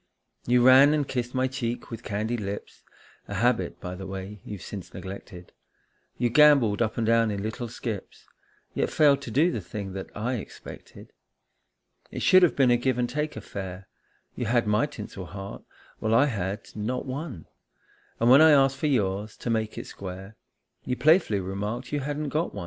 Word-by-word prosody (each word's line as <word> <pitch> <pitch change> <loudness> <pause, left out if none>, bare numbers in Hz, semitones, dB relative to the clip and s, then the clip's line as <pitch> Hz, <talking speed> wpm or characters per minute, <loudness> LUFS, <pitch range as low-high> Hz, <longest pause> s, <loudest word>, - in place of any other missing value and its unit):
You 120 0 +4
ran 135 +3 +8
and 145 -3 -1
kissed 125 0 -3
my 130 0 +2
cheek 125 -3 -4
with 115 -1 -6
candied 110 +2 -2
lips, 100 0 -6 0.5
A - - -5
habit, - - +1
by 90 - -6
the 95 +1 -7
way, 95 +1 -7
you've 100 -4 -8
since 100 -4 -8
neglected; 95 -2 -9 0.7
You 120 0 +1
gambolled 140 -8 +5
up 110 -2 0
and 115 - 0
down 115 0 +3
in 100 -1 -3
little 120 +3 -4
skips, 110 -3 -6 0.5
Yet - - 0
failed 145 -3 +4
to - - -7
do 150 +10 +3
the 110 - -3
thing 95 +2 -6
that 95 0 -6
I 120 +4 -1
expected. 105 - -11 1.0
It - - -5
should 185 - +7
have 180 - +4
been 130 -3 +4
a 120 - +5
give 125 0 0
and 120 -1 +1
take 150 +4 -3
affair; 95 -1 -7 0.5
You 120 - -3
had 120 0 +2
my 105 +5 +2
tinsel 105 -7 -8
heart, 95 +1 -8 0.4
while 110 +1 +1
I 130 +5 +6
had 105 -5 -3
not 110 +4 -3
one, 130 - -6 0.7
And 115 - +2
when 130 +4 +8
I 160 -1 +8
asked 135 -1 +4
for 150 - -1
yours, 105 -5 -1
to 120 - -3
make 110 -1 -1
it - - -5
square, 95 +2 -8 0.5
You 125 - -2
playfully 155 - +4
remarked 105 +7 -4
you 145 - 0
hadn't 145 +1 -3
got 155 +4 -2
one. - - -4
115 Hz, 185 wpm, -26 LUFS, 100-130 Hz, 1.0 s, ran